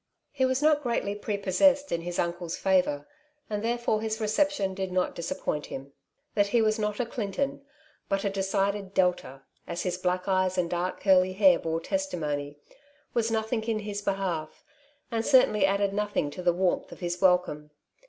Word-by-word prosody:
He 270 -2 +1
was 260 +2 0
not 305 -1 +4
greatly 235 -6 -1
prepossessed 210 +8 +2
in 170 - 0
his 175 +1 -5
uncle's 170 -1 -2
favour, 180 -7 +1 0.4
and 210 -1 -1
therefore 235 -2 0
his 220 0 -2
reception 215 -2 +1
did 190 -1 -4
not 180 0 0
disappoint 155 -3 -3
him. 135 +1 -8 0.4
That 205 -1 +3
he 235 +4 +2
was 215 -1 +2
not 210 -1 -1
a 245 - +1
Clinton, 275 +5 -3 0.5
but 195 0 0
a - - +2
decided 195 0 -1
Delta 175 -7 0
— - - -40
as 170 0 -3
his 180 -1 -2
black 180 0 -1
eyes 185 -1 +1
and 175 -2 0
dark 175 +1 -2
curly 185 -1 +4
hair 190 -3 +5
bore 165 0 -2
testimony 150 - -3 0.3
— 290 +1 -34
was 230 -1 +1
nothing 220 0 -1
in 225 -1 0
his 205 -1 -4
behalf, 190 -6 -3 0.5
and 225 -1 0
certainly 215 -7 +5
added 200 0 +1
nothing 205 -8 -1
to 180 - -7
the 175 -1 +3
warmth 180 +1 0
of - - -10
his 175 0 -3
welcome. 180 -5 +2
195 Hz, 180 wpm, -28 LUFS, 180-220 Hz, 0.5 s, hair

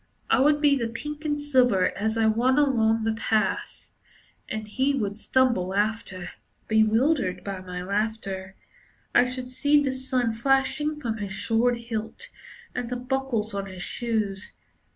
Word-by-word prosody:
I - - +5
would 295 +2 +4
be 290 -2 +5
the 235 -4 -1
pink 295 +7 -7
and 295 -1 0
silver 250 -10 +3
as 220 +2 -1
I 225 - +3
ran 235 +5 +3
along 225 -6 +3
the 225 0 +1
paths, 220 -1 -1 0.6
And 215 0 -4
he 265 +6 +1
would 205 -4 -2
stumble 235 -8 +1
after, 205 -4 -2 0.4
Bewildered 220 - +2
by 195 -2 -4
my 180 -1 -6
laughter. 195 -1 -3 0.6
I 245 - +6
should 250 0 -5
see 290 +3 +3
the 275 -2 0
sun 255 -3 0
flashing 270 +5 +1
from 230 -6 -3
his 200 -2 -4
sword 235 +1 +2
hilt 230 - -6 0.4
and 245 -1 -3
the 250 - -2
buckles 250 -4 -2
on 200 0 -3
his 185 -2 -7
shoes. 215 -4 -2
230 Hz, 150 wpm, -26 LUFS, 210-265 Hz, 0.6 s, I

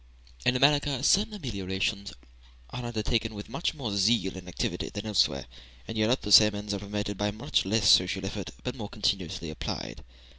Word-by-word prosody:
In 125 - +4
America 140 0 +3
certain 210 +7 +3
ameliorations 100 - -3 0.6
are 125 - -5
undertaken 115 -1 -1
with 100 - -8
much 165 - -2
more 120 -9 -4
zeal 100 -1 +2
and 90 -1 -9
activity 90 - -3
than 105 +1 -6
elsewhere; 85 -10 +1 0.4
in - - -6
Europe 110 +4 +2
the 105 - -5
same 105 0 +8
ends 105 0 -4
are 100 - -2
promoted 100 0 -4
by 105 0 +1
much 105 -1 -1
less 105 +1 +2
social 95 +1 +4
effort, 100 -1 -5 0.3
more 105 -5 -6
continuously 90 -5 -2
applied. - - -6
105 Hz, 170 wpm, -28 LUFS, 100-120 Hz, 0.6 s, same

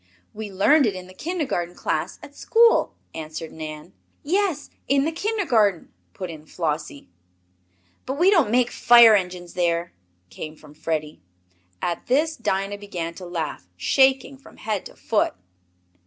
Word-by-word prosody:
"We 210 -1 -6
learned 265 +9 +4
it 200 - -1
in 185 -1 -7
the 185 - -14
kindergarten 275 - -3
class - - -2
at - - -12
school," 465 0 +3 0.2
answered 160 +1 -6
Nan. 155 +2 -8 0.3
"Yes, 350 -2 0 0.2
in 275 +1 +3
the 320 - 0
kindergarten," 310 - +1 0.2
put 185 -2 -5
in 155 -1 -12
Flossie. 150 -4 -4 1.0
"But 265 +2 -3
we 360 +5 +5
don't 335 - +4
make 245 +1 +2
fire 235 -2 +7
engines 180 -3 -1
there," 170 -1 0 0.4
came 155 +11 -7
from 150 -1 -16
Freddie. 155 -1 -4 0.6
At 170 -1 -2
this 310 +5 +2
Dinah 200 -3 -2
began 175 -5 -5
to 180 +1 -9
laugh, 160 - -4
shaking 265 - +2
from - - -17
head 210 -3 -3
to - - -17
foot. - - 0
195 Hz, 145 wpm, -23 LUFS, 170-275 Hz, 1.0 s, fire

